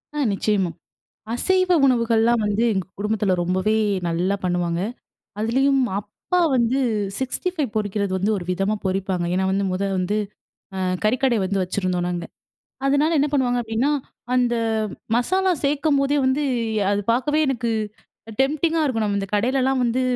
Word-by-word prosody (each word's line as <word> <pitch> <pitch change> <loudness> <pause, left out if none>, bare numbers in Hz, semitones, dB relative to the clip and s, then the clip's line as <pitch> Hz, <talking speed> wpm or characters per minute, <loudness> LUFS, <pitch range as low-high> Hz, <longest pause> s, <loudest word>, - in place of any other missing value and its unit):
அ - - -4 0.2
நிச்சயமா. 195 -2 +1 0.7
அசைவ 370 +8 +2 0.2
உணவுகள்லாம் 235 -2 +3
வந்து 205 +2 0
எங்க 190 -3 -2
குடும்பத்துல 210 -2 0
ரொம்பவே 185 +4 +1 0.3
நல்லா 180 +4 0
பண்ணுவாங்க. 175 -1 0 0.6
அதுலயும் 265 +5 +2 0.2
அப்பா 210 - -3 0.2
வந்து 245 +2 +2 0.4
65 290 +3 -2
பொறிக்கிறது 205 -2 -1
வந்து 200 +4 0
ஒரு 175 - -6
விதமா 195 +3 0
பொறிப்பாங்க. 190 -2 -1
ஏன்னா 190 +1 +1
வந்து 195 +1 0
மொத 185 +2 -2 0.2
வந்து, 200 +4 0 0.6
அ - - -3 0.3
கறிக்கடைய 245 +1 +2
வந்து 195 +1 0
வச்சுருந்தோம் 180 -1 -1
நாங்க. 175 -1 -3 0.6
அதனால 290 +4 +3
என்ன 290 - +2
பண்ணுவாங்க 245 -3 +2
அப்டீன்னா, 230 +5 0 0.4
அந்த 245 -1 +2 0.6
மசாலா 375 +10 +2
சேர்க்கும்போதே 285 0 +2
வந்து 265 +3 +1 0.5
அது 205 0 +1
பாக்கவே 265 +6 +1
எனக்கு 240 -3 -1 0.7
டெம்ப்டிங்கா 315 +4 +1
இருக்கும். 230 -7 0
நம்ம 200 -1 0
இந்த 195 - -4
கடையிலலாம் 260 +4 +1
வந்து, 245 +2 +1
225 Hz, 135 wpm, -22 LUFS, 195-270 Hz, 0.7 s, உணவுகள்லாம்